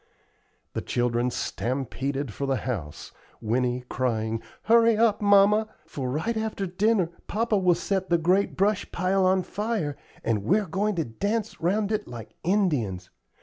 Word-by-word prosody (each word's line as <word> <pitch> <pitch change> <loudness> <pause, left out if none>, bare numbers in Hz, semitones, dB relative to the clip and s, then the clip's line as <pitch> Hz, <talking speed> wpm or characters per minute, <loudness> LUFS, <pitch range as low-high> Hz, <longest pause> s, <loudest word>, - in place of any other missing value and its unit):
The - - -2
children 120 0 0
stampeded 135 +1 -3
for 140 +7 -3
the 135 - +1
house, 100 - -5 0.3
Winnie 125 +2 0
crying: 115 -3 -1 0.2
"Hurry 230 0 +5
up, 220 -2 +3
mamma, 205 +1 +5 0.2
for 130 -3 -4
right 160 - -1
after 220 -2 -2
dinner 190 -1 +1 0.2
papa 220 -1 +1
will 180 -2 +4
set 190 0 -2
the 170 - +4
great 180 +5 +1
brush 200 +1 +1
pile 185 +1 +2
on 185 0 +3
fire, 205 -8 -2 0.3
and 110 -3 0
we're 205 - +2
going 200 +4 -1
to 165 -3 0
dance 205 - -3
round 200 +5 +1
it 215 -1 -1
like 115 -3 -9
Indians. 145 - 0
180 Hz, 145 wpm, -26 LUFS, 125-210 Hz, 0.3 s, Hurry